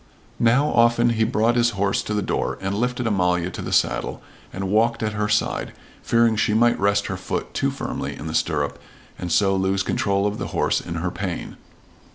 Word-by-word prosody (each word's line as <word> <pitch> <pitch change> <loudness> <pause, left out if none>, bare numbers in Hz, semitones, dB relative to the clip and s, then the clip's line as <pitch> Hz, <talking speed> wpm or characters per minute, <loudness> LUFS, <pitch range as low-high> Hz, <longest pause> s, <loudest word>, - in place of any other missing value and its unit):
Now 125 +5 +4
often 120 -1 +4
he 110 -1 +1
brought 115 +1 +2
his 120 0 +3
horse 100 0 +1
to 105 - -3
the 105 - 0
door, - - -1
and 95 +1 -2
lifted 125 +3 -1
Amalia 90 -4 +1
to - - -6
the - - -5
saddle - - 0 0.3
and 95 0 -4
walked 115 +2 +2
at 105 -1 -1
her 105 0 -1
side, 105 0 0 0.3
fearing 115 -1 +3
she 105 0 +1
might 120 +1 +3
rest 100 +1 +2
her 95 - -3
foot 95 - -4
too - - 0
firmly - - -4
in - - -8
the 80 - -4
stirrup 75 -4 -1 0.4
and 90 -1 -4
so 95 +2 +3
lose 95 0 +1
control 100 0 0
of 105 0 -2
the - - -3
horse - - +1
in 85 - -6
her 85 +2 -2
pain. 95 -3 -5
105 Hz, 205 wpm, -23 LUFS, 95-115 Hz, 0.4 s, Now